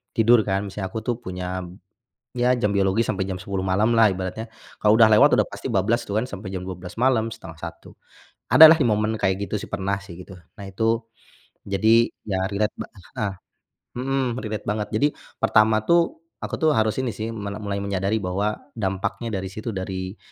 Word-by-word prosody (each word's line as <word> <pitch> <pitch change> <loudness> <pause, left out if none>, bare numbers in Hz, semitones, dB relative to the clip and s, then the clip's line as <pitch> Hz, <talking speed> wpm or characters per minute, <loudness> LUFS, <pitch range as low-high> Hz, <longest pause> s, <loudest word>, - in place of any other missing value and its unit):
tidur 115 0 +5
kan, 95 0 0
misanya 95 -1 -5
aku 110 +3 -6
tuh 120 0 -2
punya, 90 -4 -5 0.8
ya 125 +1 +2
jam 105 -2 0
biologis 100 +3 +2
sampai 95 -2 -1
jam 95 -1 -5
10.00 100 -1 -4
malam 105 +5 +2
lah 110 -2 +5
ibaratnya. 95 +5 -5 0.3
Kalau 110 +2 +5
udah 110 - +8
lewat 105 -1 +6
udah - - +2
pasti - - -6
bablas 115 +5 +1
tu 105 - -9
kan 110 +5 0
sampe 100 -2 -7
jam 95 -1 -5
12.00 90 +3 -8
malam, 120 -3 +2
12.30. 80 -6 -10 0.5
Ada 160 - +9
lah 165 - +1
di 125 - +3
momen 105 +1 +1
kayak 95 0 0
gitu 105 0 -3
sih - - -8
pernah 100 0 -2
sih, 95 -4 -11
gitu. - - -13 0.2
Nah 100 - -9
itu, 115 +4 -1 0.6
jadi, 110 +4 +4 0.2
ya 95 -3 -2
relate 105 +2 0
ba - - -5
heeh. 100 +1 -5 0.7
Mhm, 130 -2 -1
relate 110 -1 -5
banget. 105 0 -2
Jadi 115 +7 +2 0.3
pertama 110 0 +3
tuh 170 0 +3 0.2
aku - - -4
tuh 155 -1 +3
harus 110 -1 +1
ini 130 -3 -1
sih 110 +1 -4
mele 105 -2 -6
mulai 100 -1 -3
menyadari 100 +1 -1
bahwa 100 +2 -1 0.2
dampaknya 100 +2 -3
dari 95 0 -4
situ 110 +3 -5
dari 95 -1 -5
105 Hz, 190 wpm, -23 LUFS, 95-115 Hz, 0.8 s, Ada